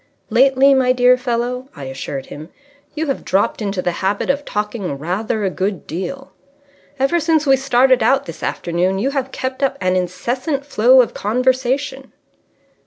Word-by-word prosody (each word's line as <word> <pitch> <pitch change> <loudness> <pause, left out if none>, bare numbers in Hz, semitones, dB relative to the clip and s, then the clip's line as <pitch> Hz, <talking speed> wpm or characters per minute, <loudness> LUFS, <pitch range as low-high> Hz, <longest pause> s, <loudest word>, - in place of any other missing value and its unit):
"Lately, 265 +3 +5
my 255 -1 +3
dear 250 0 +5
fellow," 250 +1 -3
I 140 - -9
assured 135 0 -6
him, 155 +3 -10 0.5
"you 320 +1 -1
have 275 -3 -3
dropped 195 +4 0
into 195 -3 -2
the 175 - 0
habit 200 +7 +1
of 285 +1 -4
talking 210 -7 -3
rather 195 +8 -2
a 190 - 0
good 190 0 -3
deal. 270 - -6 0.7
Ever 275 +6 +2
since 320 -1 +1
we 270 -1 +5
started 260 -1 +3
out 270 +5 +2
this 165 - -9
afternoon 180 +3 -1
you 255 +8 0
have 270 -2 -3
kept 260 +1 -4
up 275 0 0
an 185 0 0
incessant 245 - -2
flow 255 -1 +5
of - - -6
conversation!" 260 +4 -1
250 Hz, 165 wpm, -18 LUFS, 190-270 Hz, 0.7 s, Lately